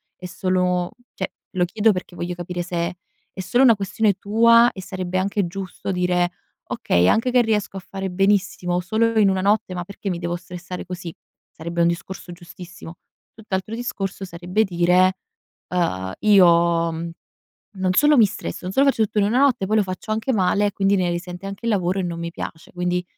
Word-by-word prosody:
è 180 Hz, -, -11 dB
solo, 180 Hz, -1 st, 0 dB, 0.2 s
cioè 190 Hz, -, -3 dB, 0.2 s
lo 180 Hz, -1 st, +1 dB
chiedo 215 Hz, +4 st, +2 dB
perché 180 Hz, -2 st, -5 dB
voglio 175 Hz, +1 st, -4 dB
capire 175 Hz, 0 st, -5 dB
se 175 Hz, 0 st, -3 dB, 0.4 s
è -, -, -11 dB
solo 240 Hz, +8 st, +2 dB
una 235 Hz, -4 st, +7 dB
questione 205 Hz, +1 st, +1 dB
tua, 230 Hz, +4 st, +5 dB
e 190 Hz, -, -9 dB
sarebbe 185 Hz, -1 st, -4 dB
anche 195 Hz, 0 st, 0 dB
giusto 195 Hz, +2 st, -5 dB
dire: 180 Hz, -1 st, +1 dB, 0.3 s
"Okay, 90 Hz, +1 st, +1 dB
anche 235 Hz, -, +2 dB
che 250 Hz, -, +5 dB
riesco 210 Hz, -4 st, -1 dB
a -, -, -3 dB
fare 195 Hz, +1 st, -5 dB
benissimo 185 Hz, -2 st, +1 dB
solo 220 Hz, +5 st, 0 dB
in 205 Hz, -2 st, +5 dB
una 190 Hz, -1 st, 0 dB
notte, 205 Hz, 0 st, +1 dB
ma 175 Hz, -1 st, -3 dB
perché 200 Hz, +1 st, -6 dB
mi 170 Hz, -, -3 dB
devo 175 Hz, 0 st, -2 dB
stressare 180 Hz, +1 st, -8 dB
così?" 180 Hz, -2 st, -7 dB, 0.4 s
Sarebbe 170 Hz, +1 st, -4 dB
un 170 Hz, -, +5 dB
discorso 175 Hz, +1 st, -4 dB
giustissimo. 175 Hz, -1 st, -11 dB, 0.4 s
Tutt'altro 210 Hz, -1 st, -4 dB
discorso 195 Hz, -5 st, -4 dB
sarebbe 180 Hz, +4 st, -1 dB
dire, 180 Hz, 0 st, +3 dB, 0.6 s
uhm: 95 Hz, -, -1 dB
"Io" 170 Hz, -4 st, +4 dB
mhmm: 165 Hz, +1 st, -5 dB, 0.6 s
"Non 190 Hz, -2 st, -1 dB
solo 295 Hz, +7 st, +5 dB
mi 230 Hz, -4 st, +7 dB
stresso, 205 Hz, -, -6 dB
non 180 Hz, +1 st, -4 dB
solo 275 Hz, +6 st, +3 dB
faccio 270 Hz, -5 st, +3 dB
tutto 215 Hz, 0 st, -1 dB
in 205 Hz, -, +4 dB
una 230 Hz, +6 st, +2 dB
notte, 265 Hz, -8 st, +3 dB
poi 215 Hz, +3 st, +1 dB
lo -, -, +4 dB
faccio 185 Hz, +3 st, -5 dB
anche 220 Hz, +4 st, -1 dB
male 205 Hz, -1 st, +2 dB
e 205 Hz, -, -1 dB
quindi, 195 Hz, 0 st, +2 dB
ne 180 Hz, -2 st, +1 dB
risente 175 Hz, +1 st, -5 dB
anche 195 Hz, +4 st, -6 dB
il 230 Hz, -, +2 dB
lavoro 185 Hz, -1 st, 0 dB
e -, -, 0 dB
non 170 Hz, -2 st, -4 dB
mi 170 Hz, 0 st, -4 dB
piace." 160 Hz, -1 st, -8 dB
Quindi, 180 Hz, 0 st, -1 dB
185 Hz, 195 wpm, -22 LUFS, 175-205 Hz, 0.6 s, una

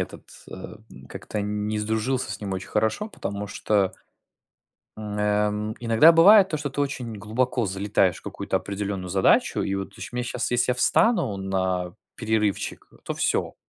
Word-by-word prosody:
этот, -, -, -6 dB, 0.3 s
э, -, -, -9 dB, 0.3 s
как-то 105 Hz, -, -5 dB
не 105 Hz, +1 st, -2 dB
сдружился 110 Hz, +4 st, -1 dB
с -, -, -6 dB
ним 100 Hz, -2 st, -4 dB
очень 95 Hz, 0 st, -5 dB
хорошо, 110 Hz, -, 0 dB
потому 100 Hz, -, -5 dB
что 100 Hz, -1 st, 0 dB, 1.1 s
М, 105 Hz, -1 st, -5 dB
эм, 105 Hz, +1 st, 0 dB
иногда 115 Hz, +7 st, +6 dB
бывает 190 Hz, +4 st, +7 dB
то, 155 Hz, -, -2 dB
что 145 Hz, -2 st, -4 dB
ты 145 Hz, -, -4 dB
очень 125 Hz, -5 st, -3 dB
глубоко 115 Hz, +3 st, -1 dB
залетаешь 95 Hz, -2 st, +1 dB
в -, -, -14 dB
какую-то -, -, -3 dB
определенную 100 Hz, -2 st, -4 dB
задачу, 95 Hz, +1 st, +3 dB
и 95 Hz, -, -2 dB
вот 95 Hz, 0 st, -5 dB
чу -, -, -8 dB
мне 125 Hz, 0 st, -3 dB
щас, 125 Hz, 0 st, -2 dB
если 120 Hz, +1 st, +2 dB
я -, -, -2 dB
встану 175 Hz, -, +3 dB
на 95 Hz, -2 st, -2 dB, 0.2 s
перерывчик, 110 Hz, -3 st, -1 dB, 0.2 s
то -, -, -3 dB
всё: -, -, -1 dB
105 Hz, 160 wpm, -24 LUFS, 100-125 Hz, 1.1 s, бывает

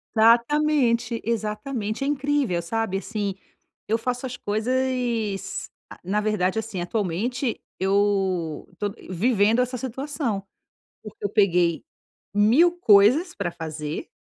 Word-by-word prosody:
Exatamente, 235 Hz, 0 st, +3 dB
exatamente. 215 Hz, +1 st, -2 dB
É -, -, -1 dB
incrível, 280 Hz, -10 st, 0 dB
sabe 225 Hz, +2 st, -2 dB
assim, 205 Hz, -1 st, -3 dB, 0.5 s
eu 220 Hz, -, +2 dB
faço 250 Hz, +2 st, -3 dB
as 250 Hz, -, -7 dB
coisas, 230 Hz, -2 st, -1 dB, 0.2 s
ah -, -, -12 dB
na 205 Hz, +4 st, 0 dB
verdade, 210 Hz, -1 st, 0 dB
assim 210 Hz, -5 st, -4 dB
atualmente, 220 Hz, +7 st, -2 dB, 0.2 s
eu 190 Hz, -4 st, 0 dB
tô 205 Hz, -1 st, -2 dB, 0.2 s
vivendo 215 Hz, +4 st, +2 dB
essa 250 Hz, +1 st, -2 dB
situação, 260 Hz, -4 st, -3 dB, 0.6 s
porque 215 Hz, -1 st, -12 dB
eu -, -, +2 dB
peguei 180 Hz, -5 st, +2 dB, 0.5 s
mil 245 Hz, +12 st, +5 dB
coisas 235 Hz, -, +5 dB
para 190 Hz, -4 st, -2 dB
fazer 155 Hz, -2 st, -5 dB
220 Hz, 115 wpm, -24 LUFS, 195-250 Hz, 0.6 s, mil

